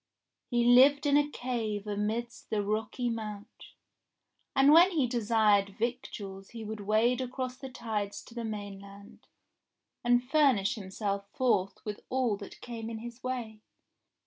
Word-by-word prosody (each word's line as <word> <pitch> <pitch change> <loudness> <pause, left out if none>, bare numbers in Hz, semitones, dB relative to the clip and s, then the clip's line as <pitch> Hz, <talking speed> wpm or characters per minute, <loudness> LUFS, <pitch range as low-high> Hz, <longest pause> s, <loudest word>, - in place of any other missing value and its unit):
He 240 -1 +2
lived 270 +5 +6
in 285 -1 +4
a 290 0 +3
cave 225 -6 -3
amidst 215 +3 -3
the 210 -2 0
rocky 215 +4 -2
Mount, 215 -1 -6 0.9
and 270 +1 +6
when 340 +4 +8
he 315 -8 +1
desired 215 -4 +2
victuals 210 -5 -4
he 230 -2 -8
would 215 0 -6
wade 220 +5 +2
across 255 0 -4
the 265 0 -8
tides 215 -5 -4
to - - -15
the 235 -1 -4
mainland 200 -2 -8 0.8
and 245 0 +3
furnish 265 -8 +3
himself 200 -1 -4
forth 200 -7 0
with 210 -1 -4
all 255 -4 +1
that 200 - -11
came 230 -2 -6
in 225 - -5
his 235 +2 -9
way. 235 -4 -4
225 Hz, 145 wpm, -30 LUFS, 205-250 Hz, 0.9 s, when